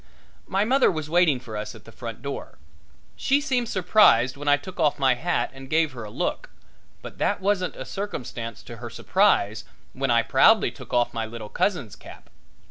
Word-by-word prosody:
My 195 +2 +1
mother 265 +4 +4
was 155 -3 -4
waiting 170 -6 +4
for 120 -3 -9
us 105 0 -5
at - - -15
the - - -13
front - - -8
door. - - -6 0.6
She 275 +2 +2
seemed 255 -5 -1
surprised 170 - +4
when 145 +1 -8
I 145 0 +5
took 185 +6 -11
off 150 -3 +2
my 135 -2 +3
hat 170 +8 -1
and 135 0 -11
gave 160 0 +2
her 120 -3 -8
a 105 - -8
look, - - -3 0.5
but - - -10
that - - +1
wasn't 190 -2 0
a - - -7
circumstance 120 - -6
to 120 - -10
her 120 0 -7
surprise 115 - +1 0.3
when 135 +1 -2
I 115 -1 +4
proudly 215 +11 +4
took 130 - -13
off 120 -1 +1
my 115 -1 -3
little 110 -2 -8
cousin's 135 - -1
cap. - - -14
145 Hz, 195 wpm, -25 LUFS, 120-190 Hz, 0.6 s, I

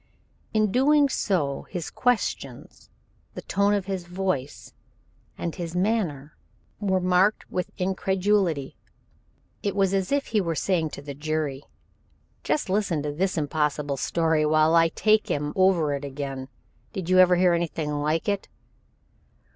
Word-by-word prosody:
In 215 -2 +2
doing 285 +4 +4
so 150 - -1
his 175 -4 -5
questions, 245 -3 -2 0.5
the - - -7
tone 200 +1 +2
of 200 -2 -2
his 190 -3 -4
voice, 180 -7 -3 0.6
and 170 - -3
his 170 -1 -6
manner 180 -8 -1 0.4
were 190 -3 +1
marked 185 +3 +2
with 180 - -3
incredulity. 190 -5 0 0.9
It 200 - -2
was 195 -1 +2
as 195 +2 0
if 285 0 +1
he 210 - +4
were 165 -3 -2
saying 165 -2 0
to 140 - -9
the 140 0 -6
jury: 150 -1 -2 0.8
"Just 300 - 0
listen 185 -6 0
to 150 - -2
this 180 +5 -1
impossible 150 -2 -1
story 160 +2 +1
while 155 +1 +3
I 165 0 +6
take 215 +5 +2
him 145 0 -1
over 185 -6 +3
it 140 0 -4
again. 135 -1 -5 0.5
Did 185 -3 -4
you 185 0 +4
ever 180 -1 +7
hear 180 0 +4
anything 165 -3 -2
like 150 +4 -1
it?" 200 -1 -1
175 Hz, 145 wpm, -25 LUFS, 150-195 Hz, 0.9 s, ever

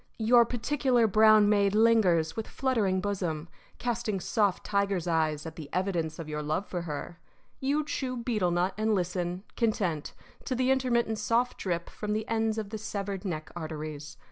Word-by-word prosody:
Your 235 +1 +5
particular 245 0 +1
brown 215 0 +6
maid 205 -1 +3
lingers, 205 -8 +4
with 225 - -4
fluttering 220 -8 0
bosom, 175 -6 -2 0.3
casting 235 -4 -2
soft 205 0 +1
tiger's 200 -3 0
eyes 155 -2 0
at 160 -1 -8
the 150 -3 -8
evidence 175 -4 -1
of 165 - -6
your 150 0 -3
love 155 +6 -1
for 180 -2 -4
her. 165 +1 -6 0.4
You 290 +3 0
chew 255 -4 -3
betel 225 -6 0
nut 175 +2 +1
and 215 0 +2
listen, 180 0 -2
content, 190 -10 -1 0.3
to 255 - -1
the 255 +1 +2
intermittent 235 -4 +1
soft 235 +4 +1
drip 170 -3 -2
from 210 -1 -4
the 215 +1 -2
ends 225 -1 0
of 210 -2 -4
the 220 - -4
severed 200 -2 -4
neck 155 -4 -4
arteries. 155 -2 -6
200 Hz, 170 wpm, -29 LUFS, 170-225 Hz, 0.4 s, brown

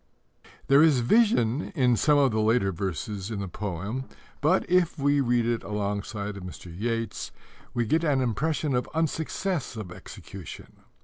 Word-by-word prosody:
There 140 +2 +6
is 150 -6 +5
vision 145 - +3
in 125 -3 +4
some 150 +5 +3
of 140 -3 +4
the 110 - 0
later 110 -3 +2
verses 95 +3 -4
in 110 -3 -3
the 100 - -3
poem, 100 +7 -4 0.4
but, 170 +6 +2
if 175 -2 +2
we 145 0 +2
read 120 -2 +2
it 120 -1 0
alongside 105 0 -3
of 95 - -8
Mr. 90 -1 -9
Yeats's, 115 +2 -3 0.4
we 120 -1 +1
get 160 +9 +1
an 145 -4 +2
impression 140 +4 0
of 125 0 0
unsuccess 160 -1 -1
of 100 -5 -6
execution. 90 0 -10
120 Hz, 160 wpm, -27 LUFS, 100-145 Hz, 0.4 s, There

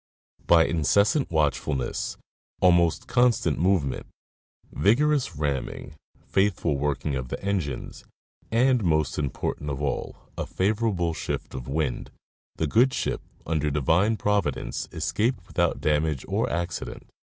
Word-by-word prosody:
By 85 -1 +6
incessant 100 - +2
watchfulness, 75 -3 -1 0.4
almost 85 -2 +3
constant 120 - +2
movement, 85 -7 +1 0.6
vigorous 135 - +2
ramming, 75 0 -3 0.3
faithful 95 -6 +1
working 70 +1 -1
of 65 -1 -3
the - - -5
engines, 95 -9 -3 0.5
and 125 0 +3
(most 80 -5 +1
important 75 +1 -3
of 70 -1 -3
all) 70 -2 -3 0.2
a - - -2
favorable 100 -4 0
shift - - -4
of 65 -2 -6
wind, 70 -2 -2 0.5
the 80 - -1
good 120 - +3
ship, - - -2 0.2
under 75 -2 0
Divine 80 - +2
Providence, 100 -12 -1
escaped 110 -4 -1
without 85 -2 0
damage 75 -2 0
or - - 0
accident. 85 0 -4
85 Hz, 120 wpm, -26 LUFS, 75-100 Hz, 0.6 s, By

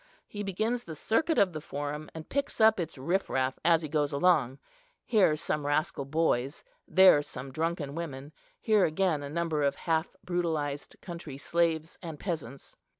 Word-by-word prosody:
He 205 - -6
begins 215 +5 -1
the 160 - -8
circuit 295 - +1
of 185 -3 +4
the 155 - -5
Forum, 145 +1 -5
and 160 -1 -8
picks 280 +1 -2
up 220 -2 +6
its 165 -5 -4
riff 175 +9 -1
raff 130 0 0
as 165 -1 +4
he - - -3
goes 150 -1 0
along—here 180 - +1
some 150 0 -2
rascal 145 -1 0
boys, 140 -2 0 0.2
there 185 -5 +7
some 135 -2 -8
drunken 160 -1 -2
women, 145 -3 -6 0.3
here 215 -3 +3
again 160 -2 +1
a 140 - -6
number 165 -1 -1
of 140 -1 +2
half 165 -1 -1
brutalized 160 -5 -2
country 170 -6 -7
slaves 165 +1 0
and 165 -4 -7
peasants. 150 - -5
160 Hz, 160 wpm, -29 LUFS, 145-180 Hz, 0.3 s, there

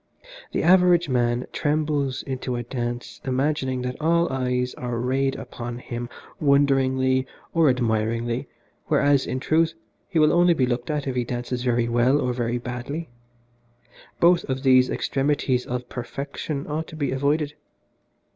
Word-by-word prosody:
The - - -1
average 175 -2 +5
man 120 -1 +1
trembles 145 -3 0
into 130 -2 -3
a 120 - -3
dance 120 -1 -5
imagining 130 -1 -1
that 125 +2 -4
all 170 -1 +2
eyes 125 -1 -1
are 120 -1 -4
rayed 135 +3 0
upon 120 -1 -6
him 120 -1 -6 0.3
wonderingly 130 -2 +3 0.3
or 165 -3 +4
admiringly, 115 +1 0 0.4
whereas, 140 -1 +3
in 130 - -2
truth, 160 +4 +2 0.3
he 185 - -2
will 155 -1 +5
only 175 0 +5
be 130 - +2
looked 120 +1 -2
at 150 -2 -1
if 135 - -2
he 125 - +1
dances 120 +1 -3
very 120 -2 +1
well 120 +4 +3
or 125 -2 0
very 120 0 -1
badly. 125 +6 -5 1.1
Both 175 0 +5
of 130 0 -3
these 130 -1 +5
extremities 135 -2 0
of 125 0 -4
perfection 140 +3 -5
ought 155 +2 -3
to - - -10
be 145 -3 -1
avoided. 145 +2 0
130 Hz, 145 wpm, -24 LUFS, 125-145 Hz, 1.1 s, average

